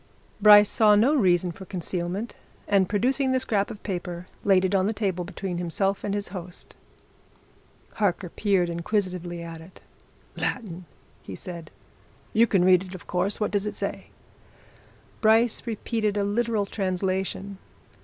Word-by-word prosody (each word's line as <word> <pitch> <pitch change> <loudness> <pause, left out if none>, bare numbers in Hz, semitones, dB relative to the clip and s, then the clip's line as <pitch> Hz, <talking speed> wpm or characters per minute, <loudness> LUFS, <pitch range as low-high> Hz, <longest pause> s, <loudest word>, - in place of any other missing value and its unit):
Bryce 210 0 +9
saw 210 -1 +4
no 235 +8 +4
reason 180 - +2
for 190 +3 -11
concealment 180 +4 -4 0.3
and 195 -3 +3
producing 260 +5 +1
the 260 - +2
scrap 205 -5 0
of 210 - -9
paper 175 -2 -5 0.2
laid 190 -2 +4
it 190 - -1
on 190 0 +2
the 220 - 0
table 190 -5 -2
between 180 0 -5
himself 195 +3 -1
and 200 -1 -1
his 205 -2 -3
host. 180 -1 -8 1.2
Harker 190 -3 0
peered 195 -2 +1
inquisitively 175 -1 -2
at 165 -1 -8
it. 165 +3 -15 0.6
"Latin!" 185 -8 -3 0.4
he - - -8
said. 170 -3 -8 0.6
"You 230 +2 +5
can 190 -4 +2
read 185 -1 +6
it, 185 0 -9
of 180 - -11
course. 185 +3 +1
What 210 - -1
does 205 0 0
it - - -4
say?" - - -4 1.1
Bryce 225 +2 +3
repeated 215 -1 -1
a 205 - +1
literal 215 0 0
translation. 190 0 -2
195 Hz, 150 wpm, -25 LUFS, 180-210 Hz, 1.2 s, Bryce